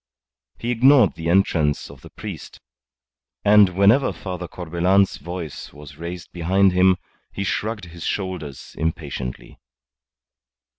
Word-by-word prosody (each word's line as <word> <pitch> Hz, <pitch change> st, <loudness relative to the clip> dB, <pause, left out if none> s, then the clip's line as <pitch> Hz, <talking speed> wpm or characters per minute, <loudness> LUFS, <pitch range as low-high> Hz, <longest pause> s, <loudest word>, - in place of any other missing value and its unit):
He 120 Hz, -, -3 dB
ignored 125 Hz, -1 st, +5 dB
the 80 Hz, 0 st, -4 dB
entrance 85 Hz, -5 st, +1 dB
of -, -, -15 dB
the -, -, -12 dB
priest, -, -, -9 dB, 0.9 s
and 105 Hz, -1 st, +7 dB
whenever 110 Hz, +8 st, +4 dB
Father 90 Hz, -2 st, -6 dB
Corbelan's 90 Hz, +3 st, +1 dB
voice 85 Hz, -1 st, -7 dB
was 75 Hz, -1 st, -12 dB
raised 85 Hz, 0 st, -7 dB
behind 95 Hz, +3 st, +2 dB
him, 90 Hz, 0 st, +4 dB, 0.3 s
he 100 Hz, -, -4 dB
shrugged 105 Hz, +1 st, -2 dB
his 85 Hz, -1 st, -10 dB
shoulders 90 Hz, -8 st, -4 dB
impatiently. 75 Hz, -6 st, -4 dB
90 Hz, 115 wpm, -22 LUFS, 80-100 Hz, 0.9 s, and